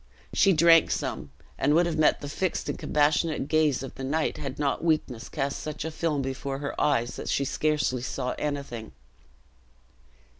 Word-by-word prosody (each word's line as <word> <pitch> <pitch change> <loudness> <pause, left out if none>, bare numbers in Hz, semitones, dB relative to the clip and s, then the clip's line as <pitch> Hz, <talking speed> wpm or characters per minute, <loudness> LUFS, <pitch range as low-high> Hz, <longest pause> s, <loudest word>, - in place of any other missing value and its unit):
She 195 - +5
drank 165 -1 +6
some, 75 - -3 0.3
and 145 +2 +3
would 175 +2 +4
have 165 -2 -2
met 155 - +3
the 145 - -5
fixed 180 +5 -2
and - - -2
compassionate 150 0 +1
gaze 155 -4 +2
of 135 - -7
the 135 - -8
knight, 155 +4 0
had 135 -3 -5
not 145 +1 -1
weakness 140 -8 0
cast 140 -2 -2
such 155 0 -5
a 160 - -3
film 155 -3 -1
before 135 +1 -4
her 140 0 -4
eyes 120 -5 +1
that - - -5
she 140 - +1
scarcely 150 -3 0
saw 125 0 -3
anything. 140 - -4
145 Hz, 175 wpm, -27 LUFS, 135-155 Hz, 0.3 s, drank